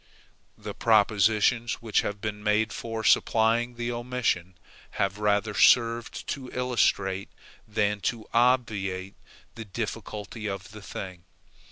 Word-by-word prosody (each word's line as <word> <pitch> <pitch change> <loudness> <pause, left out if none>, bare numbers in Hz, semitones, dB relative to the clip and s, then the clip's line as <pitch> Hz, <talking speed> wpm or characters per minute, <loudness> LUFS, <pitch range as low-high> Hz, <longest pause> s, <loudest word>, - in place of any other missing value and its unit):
The - - -7
propositions 110 +2 +3
which 110 -2 0
have 105 0 -4
been 105 -1 -4
made 105 +1 +1
for 115 -1 -5
supplying 115 +3 +3
the 120 0 -3
omission 120 -8 -2 0.4
have 100 +1 -1
rather 105 0 +1
served 115 +2 +3
to 130 -2 -4
illustrate 100 -6 0 0.4
than 105 -1 0
to 115 -3 -7
obviate 105 -6 +1 0.4
the 115 - -8
difficulty 110 0 -5
of 100 +2 -6
the 105 0 -10
thing. 95 -3 -8
110 Hz, 120 wpm, -27 LUFS, 100-115 Hz, 0.4 s, propositions